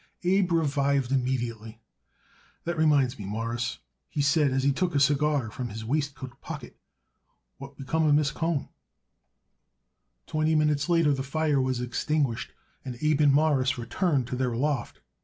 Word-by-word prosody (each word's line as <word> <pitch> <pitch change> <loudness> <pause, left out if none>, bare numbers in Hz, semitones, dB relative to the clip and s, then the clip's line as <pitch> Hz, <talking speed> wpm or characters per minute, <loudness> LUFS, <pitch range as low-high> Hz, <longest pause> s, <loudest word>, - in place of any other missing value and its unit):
Abe 185 0 +2
revived 140 -4 +1
immediately. 120 -4 -2 0.8
"That 170 +1 -2
reminds 145 -6 +2
me, 100 - -6
Mawruss," 115 +3 -3 0.3
he - - -5
said 145 +1 +3
as 130 0 0
he 140 - +3
took 175 +3 -1
a - - +4
cigar 140 -4 +2
from 125 +2 -5
his 110 +1 -7
waistcoat 140 -1 -3
pocket: - - -8 0.8
"What 135 +1 -10
become 155 +4 0
of 145 - +5
Miss 145 -2 +2
Cohen?" 165 -4 -2 1.6
Twenty 155 +1 0
minutes 150 0 +1
later 165 -4 +4
the 135 - -2
fire 145 +1 0
was 130 -1 -1
extinguished, 130 0 -1 0.3
and 125 -2 -6
Abe 155 -1 +2
and 145 -2 +5
Morris 140 -3 +2
returned 135 - 0
to - - -2
their 125 -2 -1
loft. 135 - -2
140 Hz, 150 wpm, -27 LUFS, 125-155 Hz, 1.6 s, of